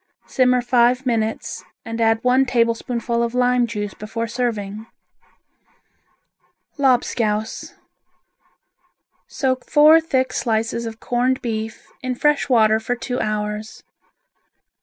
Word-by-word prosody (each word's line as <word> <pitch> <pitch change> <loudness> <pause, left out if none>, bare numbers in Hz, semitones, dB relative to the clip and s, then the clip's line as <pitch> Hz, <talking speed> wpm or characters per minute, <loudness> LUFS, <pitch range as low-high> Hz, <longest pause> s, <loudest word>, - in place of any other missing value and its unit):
Simmer 250 -1 +2
five 245 +1 +2
minutes 225 -3 -2 0.2
and 230 0 -4
add 225 0 +2
one 250 +1 +4
tablespoonful 235 0 0
of 235 +1 -2
lime 250 -1 +2
juice 205 -3 -4
before 225 +2 -5
serving. 225 -3 -3 1.9
Lobscouse 230 -5 0 1.5
Soak 260 -2 -2
four 310 +2 +7
thick 260 -5 -1
slices 230 0 -1
of 225 0 -8
corned 250 +2 0
beef 220 -2 -4 0.2
in 255 -1 -3
fresh 295 +2 +1
water 220 -3 +4
for 245 +3 -2
two 245 +1 -4
hours. 210 0 -4
235 Hz, 105 wpm, -21 LUFS, 220-250 Hz, 1.9 s, four